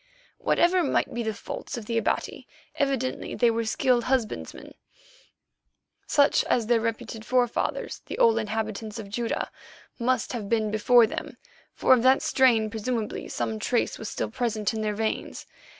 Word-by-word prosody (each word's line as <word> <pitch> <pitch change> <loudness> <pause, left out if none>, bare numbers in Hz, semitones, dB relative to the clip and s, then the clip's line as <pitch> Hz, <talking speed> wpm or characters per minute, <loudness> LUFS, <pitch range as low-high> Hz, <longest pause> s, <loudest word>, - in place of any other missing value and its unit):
Whatever 360 +1 +3
might 280 - 0
be 240 - -2
the 220 -1 -1
faults 215 - -7
of 225 - -7
the 230 - -3
Abati, 230 - -1 0.3
evidently 270 -3 -1
they 240 -2 +3
were 230 0 -1
skilled 245 +1 +1
husbandsmen, 250 -4 -2 1.3
such 285 -1 +4
as 235 -3 +1
their 230 0 +2
reputed 230 0 -4
forefathers, 245 0 -1
the - - -5
old 230 0 +4
inhabitants 215 0 -3
of 210 -3 -7
Judæa, 230 +3 -2 0.5
must 255 +1 0
have 215 -5 -4
been 220 -2 +1
before 230 +2 +5
them, 220 - -6 0.4
for - - +5
of 250 - +4
that 260 +2 +4
strain 230 -5 +3
presumably 225 0 -3
some 220 -1 -3
trace 235 +2 0
was 220 - -5
still - - -3
present 225 -4 -1
in 220 - -3
their 210 -1 -1
veins. 220 +1 -3
230 Hz, 155 wpm, -26 LUFS, 220-250 Hz, 1.3 s, before